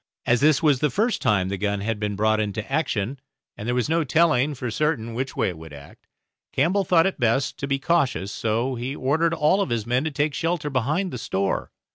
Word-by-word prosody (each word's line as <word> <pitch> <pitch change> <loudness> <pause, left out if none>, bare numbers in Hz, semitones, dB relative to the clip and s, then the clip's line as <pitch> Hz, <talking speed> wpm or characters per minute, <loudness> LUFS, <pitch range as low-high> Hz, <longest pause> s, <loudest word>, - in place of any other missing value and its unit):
As 120 +2 +2
this 150 +1 +4
was 145 -4 +4
the 150 - +2
first 220 - 0
time 95 -3 +2
the 100 -1 -3
gun 100 -1 -1
had 110 +1 -2
been 105 -1 -2
brought 110 +1 +2
into 105 0 -2
action, 135 -4 -1 0.4
and 105 - -7
there 120 - 0
was 125 - 0
no 165 +1 +1
telling 150 -2 +2
for 125 -2 -4
certain 125 -4 -1
which 130 +3 -4
way 115 -6 +1
it 85 -3 -8
would 80 -2 -11
act, 70 0 -14 0.4
Campbell 195 +4 +2
thought 165 -2 +4
it 190 - -1
best 120 +3 +1
to 140 - -3
be 140 0 +1
cautious; 135 - 0
so 115 +5 -1
he 125 +3 -4
ordered 160 +6 +1
all 165 +6 +3
his 115 - -2
men 125 +3 +1
to 160 - -1
take 145 0 -1
shelter 165 -2 -1
behind 150 - 0
the 125 - -4
store. 95 -2 -2
130 Hz, 220 wpm, -24 LUFS, 110-155 Hz, 0.4 s, this